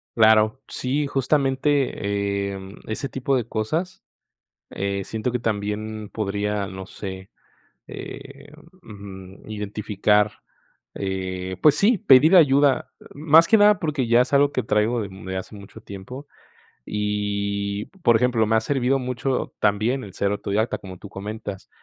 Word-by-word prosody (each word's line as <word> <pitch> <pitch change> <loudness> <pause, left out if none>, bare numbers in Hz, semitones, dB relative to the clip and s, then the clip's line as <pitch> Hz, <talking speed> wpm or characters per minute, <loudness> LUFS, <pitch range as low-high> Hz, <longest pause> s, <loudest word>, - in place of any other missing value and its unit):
Claro. 110 +2 +4
Sí, 140 +3 -1
justamente, 130 -8 0
em, 95 +1 -10
ese 125 +5 -4
tipo 135 +2 -1
de 120 -4 0
cosas, 155 +12 -2 0.7
eh, 100 0 -3
siento 110 +4 -3
que 125 - -1
también 110 -1 -3
podría, 105 -1 -2
no 95 0 -7
sé, 95 -1 -8 0.6
em, 140 +1 -10 0.3
ujú, 95 - -11
identificar. 105 0 0 0.6
Eh, 95 -1 -4
pues 150 -2 +6
sí, 205 +7 +3
pedir 150 +5 +6
ayuda 140 -4 +4 0.2
más 160 +3 +5
que 220 - +5
nada, 205 -1 +5
porque 150 -7 -1
ya 120 +1 +5
es 125 - -2
algo 140 0 +4
que 130 - -1
traigo 110 +2 +1
de 100 - -4
de 95 0 -6
hace 95 - -7
mucho 100 -1 -12
tiempo 125 +9 -9 0.6
y, 100 -1 -2 0.2
por 120 -1 +5
ejemplo, 120 -2 +2
me 110 - +1
ha - - +1
servido 135 +1 +1
mucho 125 +1 -2
también 110 +6 +1
el 100 - -9
ser 100 0 0
autodidacta, 105 +3 -1
como 95 -2 -10
tú 100 - -11
comentas, 100 0 -7
110 Hz, 140 wpm, -23 LUFS, 100-135 Hz, 0.7 s, pues